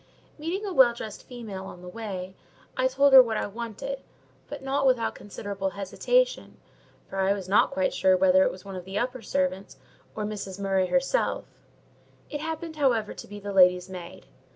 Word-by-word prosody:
Meeting 355 Hz, +7 st, -3 dB
a 390 Hz, -, -3 dB
well 250 Hz, -6 st, +6 dB
dressed 215 Hz, -3 st, -7 dB
female 220 Hz, -6 st, -7 dB
on 180 Hz, -, -11 dB
the -, -, -9 dB
way, 190 Hz, -2 st, -6 dB, 0.4 s
I 255 Hz, 0 st, +2 dB
told 275 Hz, +1 st, +3 dB
her 265 Hz, -, +12 dB
what 225 Hz, -3 st, -1 dB
I -, -, -1 dB
wanted; 235 Hz, -, -5 dB, 0.5 s
but -, -, -8 dB
not 270 Hz, 0 st, +1 dB
without 250 Hz, -3 st, +2 dB
considerable 200 Hz, -1 st, -5 dB
hesitation, -, -, 0 dB, 0.5 s
as -, -, -14 dB
I 195 Hz, 0 st, +2 dB
was 195 Hz, -2 st, -6 dB
not 195 Hz, -, +4 dB
quite 275 Hz, 0 st, 0 dB
sure 185 Hz, -1 st, +4 dB
whether 185 Hz, 0 st, +5 dB
it -, -, +2 dB
was 185 Hz, -, -12 dB
one 195 Hz, -1 st, -7 dB
of 180 Hz, -1 st, -7 dB
the 190 Hz, +1 st, -5 dB
upper 250 Hz, +1 st, -2 dB
servants, 275 Hz, -8 st, -2 dB, 0.4 s
or 215 Hz, -, -2 dB
Mrs. 200 Hz, -2 st, -5 dB
Murray 195 Hz, -1 st, +1 dB
herself: 270 Hz, -, +1 dB, 0.9 s
it 295 Hz, -, -4 dB
happened, 320 Hz, 0 st, -5 dB
however, 240 Hz, -7 st, +1 dB
to -, -, -10 dB
be 205 Hz, 0 st, -9 dB
the 205 Hz, 0 st, -6 dB
lady's 180 Hz, -1 st, +5 dB
maid. 175 Hz, -2 st, -9 dB
215 Hz, 185 wpm, -27 LUFS, 190-270 Hz, 0.9 s, her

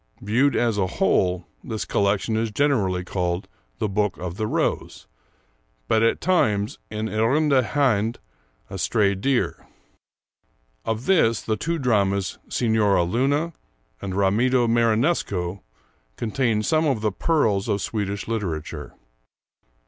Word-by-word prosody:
Viewed 125 Hz, +8 st, +2 dB
as 115 Hz, -4 st, +1 dB
a 95 Hz, -, +2 dB
whole, 90 Hz, -1 st, +2 dB, 0.2 s
this 110 Hz, -4 st, -4 dB
collection 100 Hz, +2 st, 0 dB
is 110 Hz, 0 st, 0 dB
generally 105 Hz, -8 st, +1 dB
called 90 Hz, 0 st, -2 dB, 0.3 s
'The 105 Hz, -, -1 dB
Book 105 Hz, -2 st, 0 dB
of 90 Hz, -1 st, -5 dB
the 110 Hz, +1 st, -2 dB
Rose,' -, -, -2 dB, 0.8 s
but 110 Hz, -, +3 dB
at 115 Hz, -, +2 dB
times 105 Hz, -, +1 dB
'En 110 Hz, 0 st, -3 dB
Irrande 130 Hz, +6 st, +2 dB
Hind' 120 Hz, -5 st, +1 dB, 0.5 s
(A 95 Hz, -, -5 dB
Stray 100 Hz, 0 st, +2 dB
Deer). 125 Hz, +7 st, -1 dB, 1.2 s
Of 110 Hz, +2 st, -2 dB
this, 115 Hz, -, +3 dB
the 110 Hz, -, 0 dB
two 165 Hz, +8 st, -2 dB
dramas, 100 Hz, -, 0 dB
'Signora 110 Hz, -6 st, +2 dB
Luna' 140 Hz, -, 0 dB, 0.5 s
and 95 Hz, -2 st, -4 dB
'Ramido 120 Hz, +6 st, +2 dB
Marinesco,' 115 Hz, -, +1 dB, 0.6 s
contain 115 Hz, -2 st, 0 dB
some 155 Hz, +5 st, +2 dB
of 130 Hz, -7 st, 0 dB
the 105 Hz, -1 st, +1 dB
pearls 110 Hz, -, +1 dB
of 100 Hz, -2 st, 0 dB
Swedish 100 Hz, -2 st, -3 dB
literature. 80 Hz, -9 st, -4 dB
110 Hz, 125 wpm, -23 LUFS, 100-125 Hz, 1.2 s, but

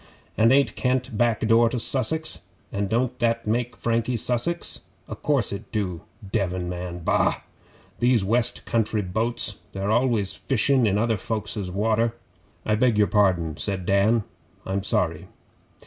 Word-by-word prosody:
And 115 Hz, +2 st, +4 dB
ain't 140 Hz, +1 st, +3 dB
Kent 130 Hz, -1 st, -1 dB
back 115 Hz, 0 st, +1 dB
door 115 Hz, +1 st, +4 dB
to 125 Hz, -, -3 dB
Sussex? 135 Hz, +6 st, 0 dB, 0.3 s
And 100 Hz, 0 st, -2 dB
don't 120 Hz, +3 st, 0 dB
that 115 Hz, -1 st, +1 dB
make 120 Hz, +3 st, -1 dB
Frankie 115 Hz, +1 st, 0 dB
Sussex? 125 Hz, +10 st, 0 dB, 0.3 s
O' -, -, -6 dB
course 140 Hz, -5 st, 0 dB
it 100 Hz, +1 st, -7 dB
do. 95 Hz, -6 st, -2 dB, 0.3 s
Devon 95 Hz, -3 st, -1 dB
man! 90 Hz, -1 st, -5 dB
Bah! -, -, +1 dB, 0.6 s
Those 120 Hz, -3 st, +3 dB
West 115 Hz, +4 st, 0 dB
Country 110 Hz, -2 st, 0 dB
boats 110 Hz, +2 st, -1 dB, 0.2 s
they're 95 Hz, +2 st, -2 dB
always 115 Hz, -4 st, +1 dB
fishin' 130 Hz, -1 st, +2 dB
in 100 Hz, 0 st, +2 dB
other 115 Hz, 0 st, +1 dB
folks' 105 Hz, +2 st, -3 dB
water.' 110 Hz, +4 st, +1 dB, 0.5 s
'I 105 Hz, -, +2 dB
beg 120 Hz, -1 st, +3 dB
your 105 Hz, -, +5 dB
pardon,' 90 Hz, -6 st, +1 dB
said 95 Hz, -3 st, -1 dB
Dan. 105 Hz, +4 st, +3 dB, 0.4 s
'I'm 95 Hz, +1 st, -1 dB
sorry. 85 Hz, -4 st, 0 dB
110 Hz, 145 wpm, -24 LUFS, 100-120 Hz, 0.6 s, your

